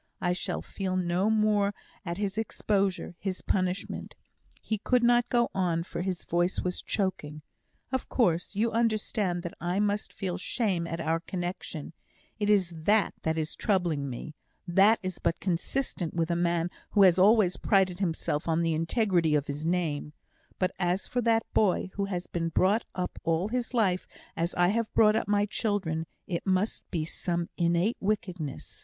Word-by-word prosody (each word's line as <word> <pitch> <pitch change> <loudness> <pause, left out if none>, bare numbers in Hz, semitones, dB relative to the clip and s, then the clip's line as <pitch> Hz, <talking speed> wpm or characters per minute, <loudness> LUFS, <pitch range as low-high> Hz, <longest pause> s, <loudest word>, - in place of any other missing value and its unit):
I 175 0 +1
shall 180 - -3
feel 190 -2 -3
no 180 +3 +1
more 210 -2 +2 0.3
at 170 -2 -4
his 200 -1 -2
exposure 200 -4 -1
his 190 -2 -4
punishment 185 0 -2 0.2
" - - -38
He 220 -2 -3
could 250 +3 +2
not 240 0 +4
go 240 -1 +2
on, 175 -3 +1
for 170 - -5
his 180 -1 -3
voice 175 +2 0
was 180 0 -2
choking. 155 -7 -2 0.5
"Of 260 -1 -2
course, 180 -5 +1
you 225 +3 +1
understand 215 -5 0
that 175 - -5
I 175 +3 0
must 205 0 0
feel 185 -1 -4
shame 190 -5 -1
at 165 0 -4
our 165 0 0
connexion; 175 -3 -5 0.5
it 205 0 0
is 195 -4 +3
that 210 0 +3
that 160 0 0
is 155 -1 -2
troubling 170 -9 0
me; 130 +5 -6 0.3
that 195 +6 +5
is 185 -2 -4
but 165 - 0
consistent 180 0 -2
with 165 0 0
a - - +2
man 170 0 +1 0.2
who 205 - +6
has 185 -1 +6
always 200 -2 +5
prided 190 -3 +2
himself 160 -4 -1
on 165 +1 +2
the 165 -1 +1
integrity 165 -1 +2
of 145 -1 +1
his 150 +2 -4
name; 160 -4 -1 0.4
but 185 0 +1
as 180 +1 0
for 250 - -1
that 225 -1 +3
boy, 190 -2 +2
who 200 - -1
has 180 -3 -3
been 165 -1 -2
brought 195 +7 +2
up 180 -1 -3
all 165 +4 +1
his 245 0 -2
life 190 -6 +2 0.3
as 170 +1 -1
I 175 0 +4
have 225 +2 0
brought 215 -1 +6
up - - 0
my 205 0 +3
children, 195 -7 -1 0.2
it 175 +1 -4
must 190 +3 0
be 160 -4 -1
some 170 +1 -3
innate 175 +6 +1
wickedness! 180 - -3
185 Hz, 175 wpm, -28 LUFS, 170-205 Hz, 0.5 s, who